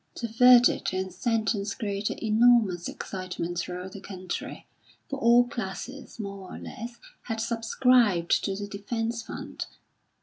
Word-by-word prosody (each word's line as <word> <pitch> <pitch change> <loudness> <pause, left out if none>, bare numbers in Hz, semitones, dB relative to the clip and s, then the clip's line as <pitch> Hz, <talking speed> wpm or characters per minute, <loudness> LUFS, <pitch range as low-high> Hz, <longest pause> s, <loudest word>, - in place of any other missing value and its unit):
The 235 - -2
verdict 245 0 +6
and 190 -1 -2
sentence 220 -2 0
created 205 -3 -3
enormous 220 -5 +4
excitement 180 -2 -4
throughout 180 +2 -5
the 200 - -8
country, 185 -2 -6 0.4
for 275 - -4
all 240 +1 +5
classes, 240 +4 -6
more 200 -3 -6
or - - -7
less, 235 +2 -8 0.3
had 225 -2 -3
subscribed 230 -4 +3
to 195 - -1
the 205 +1 -5
defence 225 +3 -3
fund. - - -7
215 Hz, 130 wpm, -27 LUFS, 190-235 Hz, 0.4 s, verdict